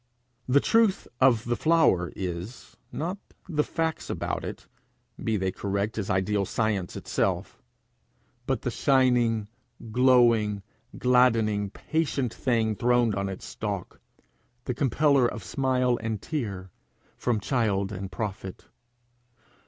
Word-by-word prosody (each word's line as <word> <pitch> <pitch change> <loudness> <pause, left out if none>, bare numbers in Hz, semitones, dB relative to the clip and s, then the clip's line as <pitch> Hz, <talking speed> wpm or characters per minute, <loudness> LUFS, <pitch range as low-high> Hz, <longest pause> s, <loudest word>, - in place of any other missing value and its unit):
The 130 +3 +5
truth 225 +2 +2
of 125 -4 +4
the 120 0 0
flower 155 - +3
is, 90 +5 -6 0.2
not 180 +6 -3 0.3
the 150 -4 +1
facts 160 +1 -2
about - - -3
it, - - -7 0.6
be 110 -1 +1
they 95 -1 -1
correct 100 +3 -2
as 100 - -3
ideal 100 +1 +1
science 100 -2 -1
itself, - - -2 0.9
but - - -1
the - - -1
shining, 125 -5 +2 0.4
glowing, 115 -5 +4 0.3
gladdening, 115 -5 +3
patient 140 -1 -2
thing 115 -4 0
throned 120 0 +2
on 100 0 -2
its 95 - -7
stalk 100 -4 -5 0.6
the 125 - -2
compeller 140 0 +3
of 115 - -6
smile 130 -2 +1
and 110 -2 -2
tear 100 - -4 0.4
from 120 -3 0
child 105 -4 0
and 95 -1 -6
prophet. 95 -2 -5
115 Hz, 120 wpm, -27 LUFS, 100-130 Hz, 0.9 s, The